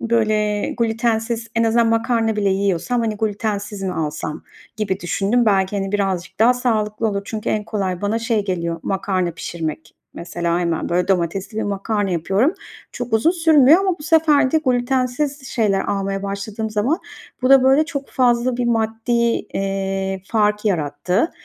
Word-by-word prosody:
böyle, 215 -2 +1
glütensiz 230 0 0
en 230 0 +2
azından 230 +1 +3
makarna 225 -1 +1
bile 205 -1 +1
yiyorsam, 195 +4 0
hani, 220 -2 -1
glütensiz 205 -1 -3
mi 190 -1 -2
alsam 150 -1 -4 0.3
gibi 200 -3 -2
düşündüm. 205 +6 +1
Belki, 195 -1 +2
hani, 195 0 -3
birazcık 195 -3 -2
daha 240 +3 +6
sağlıklı 220 -3 0
olur. 200 -1 -2
Çünkü 215 0 -4
en 210 -1 0
kolay 190 -5 -2
bana 205 +2 0
şey 225 -2 0
geliyor, 170 -3 -2
makarna 190 -2 -1
pişirmek. 160 -1 -5 0.2
Mesela, 170 0 -2
hemen, 170 -2 -1
böyle, 180 +2 0
domatesli 190 +3 -1
bir 220 - 0
makarna 205 0 -1
yapıyorum. 195 - +1 0.4
Çok 245 -2 -6
uzun 225 +9 +4
sürmüyor 325 -2 +5
ama 380 -3 0
bu - - -11
sefer 310 -4 +3
de 320 - +4
glütensiz 260 +2 0
şeyler 205 -4 +1
almaya 195 0 -2
başladığım 200 +2 -4
zaman 220 - 0 0.4
bu 255 - +2
da, 270 -1 +8
böyle, 270 +4 +4
çok 280 -3 -5
fazla 245 -1 +2
bir 245 - -1
maddi, 225 0 -1
eee, 195 -4 -1
fark 210 -1 +1
yarattı. 180 - 0
215 Hz, 155 wpm, -20 LUFS, 195-240 Hz, 0.4 s, da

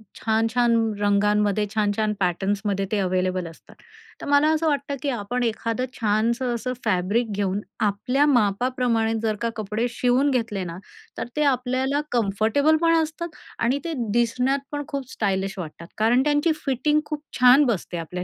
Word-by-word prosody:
छान-छान 225 +1 +1 0.2
रंगांमध्ये, 210 0 +2
छान-छान 210 0 +1
पॅटर्न्समध्ये 195 +2 0
ते 210 - +1
अवेलेबल 185 -1 0
असतात. 165 - -15 0.5
तर - - -6
मला 285 +2 +4
असं 320 +1 0
वाटतं, 280 -1 -1
की 285 - -1
आपण 245 +1 -2
एखादं 230 +2 -1
छानसं 235 +3 +1
असं 255 +2 -3
फॅब्रिक 210 +4 +1
घेऊन 200 0 -1 0.2
आपल्या 230 +7 +1
मापाप्रमाणे 240 -1 +1
जर 215 -1 +1
का 230 - 0
कपडे 215 +2 -2
शिवून 250 +4 +2
घेतले 225 -6 -1
ना, 170 0 -6 0.4
तर - - -3
ते 300 - +1
आपल्याला 265 +1 +1
कम्फर्टेबल 230 +8 +2
पण 330 0 +4
असतात 320 +1 -5 0.2
आणि 255 +5 +1
ते 330 - -2 0.2
दिसण्यात 250 +4 +1
पण 290 0 -3
खूप 275 -4 -5
स्टायलिश 195 -1 -1
वाटतात, 170 0 -8
कारण 235 +4 +3
त्यांची 295 +2 +2
फिटिंग 295 +3 +1
खूप 300 -1 -5 0.2
छान 255 +3 +7
बसते 190 -6 -2
आपल्या 180 +2 -5
230 Hz, 150 wpm, -24 LUFS, 205-265 Hz, 0.5 s, छान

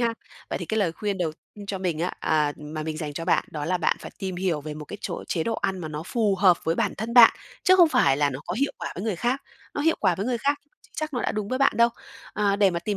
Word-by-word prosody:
ha. 230 -1 +1 0.4
Vậy - - -1
thì - - -4
cái 220 - -1
lời 180 -6 +1
khuyên 200 +2 -3
đầu 165 -3 -1 0.3
cho 195 -1 -3
mình 175 -4 -1
á 175 +2 -1
à, 150 -2 +2
mà 150 +1 -6
mình 155 0 -4
dành 155 -2 -4
cho 165 +3 -5
bạn 175 - +2
đó 150 -2 -4
là 180 +3 0
bạn 165 - +2
phải - - -8
tìm 190 -3 -4
hiểu 180 -5 0
về 150 0 -6
một 150 - -7
cái - - -8
chỗ - - -5
chế 165 - 0
độ 225 - -1
ăn 190 -3 -1
mà 165 -3 -5
nó 150 0 -5
phù 210 -5 +1
hợp 185 -2 +5
với 165 - +1
bản - - 0
thân 230 +3 -3
bạn, 240 -2 +10 0.3
chứ 370 - +6
không 350 -3 +7
phải 135 - +3
là 145 -1 +2
nó 130 - -6
có - - -2
hiệu 280 +5 0
quả - - -4
với 185 - -5
người 210 -6 -1
khác. 245 +8 -1 0.3
Nó - - -2
hiệu 325 +2 +3
quả 185 -4 +3
với 195 +5 -3
người 245 -2 0
khác, 285 +4 +1
nhưng 295 - -40
chưa - - -23
chắc 310 -2 -3
nó 245 - 0
đã - - 0
đúng 210 -1 -3
với 255 - -1
bạn 275 - +4
đâu. 235 +1 +6 0.4
À, 200 -1 +1
để 200 -2 +4
mà 170 - -1
tìm 200 +4 -2
190 Hz, 310 wpm, -25 LUFS, 160-230 Hz, 0.4 s, bạn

